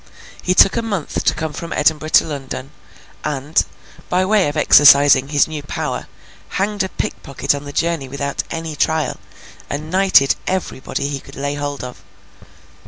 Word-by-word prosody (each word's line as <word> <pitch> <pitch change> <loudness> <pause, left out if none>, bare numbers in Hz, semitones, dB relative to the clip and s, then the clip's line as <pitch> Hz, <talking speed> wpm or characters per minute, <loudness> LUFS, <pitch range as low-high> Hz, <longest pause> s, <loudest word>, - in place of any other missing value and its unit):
He 185 - 0
took 195 - +6
a - - +1
month 205 -8 -3
to - - +3
come 160 -1 -4
from 170 +3 -7
Edinburgh 155 +1 +1
to - - +5
London; 135 -2 -6 0.5
and, 150 +1 0 0.5
by 185 +1 +2
way 205 -3 +3
of 145 +2 -3
exercising 140 -2 +6
his 145 -1 +2
new 155 -2 -6
power, 145 - -4 0.5
hanged 205 +1 -1
a 190 - -1
pickpocket 140 -4 -2
on 140 0 -6
the 145 - -7
journey 165 -3 -1
without 140 +1 -3
any 165 -2 -5
trial, 160 +1 0 0.5
and 155 +2 -5
knighted 185 -7 +4
everybody 170 -7 -3
he 140 -1 -4
could 135 - -14
lay 140 +1 -3
hold 145 -1 -4
of. 125 -1 -9
150 Hz, 165 wpm, -19 LUFS, 140-170 Hz, 0.5 s, took